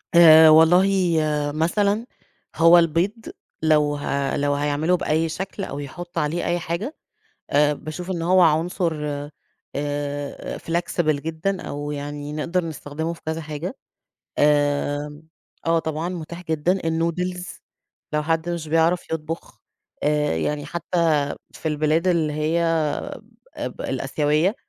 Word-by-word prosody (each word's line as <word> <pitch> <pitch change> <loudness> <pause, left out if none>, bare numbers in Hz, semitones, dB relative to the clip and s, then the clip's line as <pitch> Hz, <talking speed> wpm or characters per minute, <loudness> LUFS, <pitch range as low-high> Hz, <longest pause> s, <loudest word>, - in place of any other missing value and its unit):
آآ، 160 -2 +9
والله 165 +5 +6 0.7
مثلًا 200 +7 +1 0.5
هو 165 +1 +7
البيض، 170 +4 +2 0.5
لو 150 -2 +3
ه 140 -1 -1
لو 145 0 +1
هيعمله 145 +5 +1
بأي 160 0 0
شكل 190 +4 -5
أو 140 -5 -5
يحطوا 170 +4 -5
عليه 155 +4 -1
أي 175 0 0
حاجة 170 - -4 0.6
آآ، 145 +1 +4
باشوف 155 +5 -7
إن 175 -3 -2
هو 185 +2 +4
عنصر 165 +2 +2 0.8
آآ، 145 0 -4
flexible 165 -3 -1
جدًا 165 +5 -2
أو 145 0 -5
يعني 145 0 -5
نقدر 170 +4 -1
نستخدمه 160 +1 -4
في 170 - -11
كذا 160 +1 -2
حاجة 155 - -5 0.6
آمم، 145 0 +1 0.4
آه، 165 0 +3
طبعًا 160 +1 -3
متاح 170 0 -7
جدًا 165 +3 0
النودلز 180 +3 -2 0.5
لو 150 0 +1
حد 165 +2 0
مش 170 -2 -3
بيعرف 165 +3 +1
يطبخ 160 +1 -5 0.4
آآ، 150 - +1
يعني 145 - -2
حتى 165 -4 0 0.2
في - - -5
البلاد 155 +3 +1
اللي 165 -4 +2
هي 155 +3 0
آآ، 165 -3 -1 0.5
ب - - -9
الآسيوية 155 - 0
160 Hz, 125 wpm, -23 LUFS, 150-170 Hz, 0.8 s, آآ